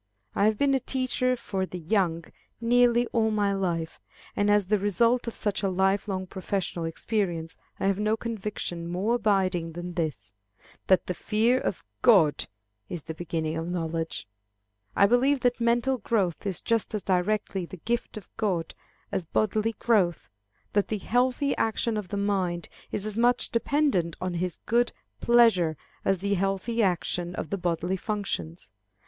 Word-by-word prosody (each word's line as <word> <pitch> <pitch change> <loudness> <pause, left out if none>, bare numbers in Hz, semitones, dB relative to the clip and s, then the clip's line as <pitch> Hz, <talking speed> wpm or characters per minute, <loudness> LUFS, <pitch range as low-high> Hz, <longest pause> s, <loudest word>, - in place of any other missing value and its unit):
I 200 - +2
have 215 0 +3
been 280 +2 +3
a 270 - +3
teacher 255 0 0
of 190 -6 -3
the 180 - -5
young 170 -2 0 0.3
nearly 240 0 +4
all 225 -1 +3
my 205 -2 +1
life, 170 -4 -2 0.4
and 205 0 +2
as 205 -1 +4
the 205 +2 +2
result 230 +5 +2
of 230 - -4
such 205 -1 -1
a 195 - +1
life 190 +2 +1
long 190 -2 -2
professional 185 -2 -3
experience, 165 -1 -2 0.2
I - - -1
have 195 0 +2
no 215 +1 +1
conviction 210 -7 -4
more 185 +7 0
abiding 190 -7 +1
than 175 +1 -6
this, 125 - -3 0.5
that 185 - +4
the 180 - -2
fear 225 +7 +2
of - - -3 0.2
God 190 -12 +5 0.4
is 170 -4 -5
the 160 - -6
beginning 160 -1 -3
of 165 +1 -3
knowledge. 165 - -3 0.7
I 200 - +6
believe 255 +5 +3
that 245 -1 +1
mental 240 +3 +2
growth 200 -4 0
is 190 - -2
just 230 -1 0
as 210 - -3
directly 190 0 0
the 185 - -9
gift 235 +5 -2
of 205 - -9
God 185 -6 -1 0.4
as 180 - -2
bodily 215 +5 0
growth; 190 - +1 0.4
that 205 -1 +2
the 215 - -1
healthy 250 +6 +1
action 225 +1 0
of 210 -3 -3
the 200 - -4
mind 190 -4 -1 0.2
is 205 - -2
as 215 +1 -2
much 245 +1 +2
dependent 230 - +1
on 185 -1 -2
his 175 0 -2
good 240 +2 +2 0.3
pleasure 225 -10 +4 0.3
as 195 - +2
the 200 +2 -1
healthy 195 +4 0
action 180 -2 0
of 155 - -5
the 200 - 0
bodily 175 +1 -1
functions. 190 - -4
200 Hz, 165 wpm, -27 LUFS, 175-230 Hz, 0.7 s, I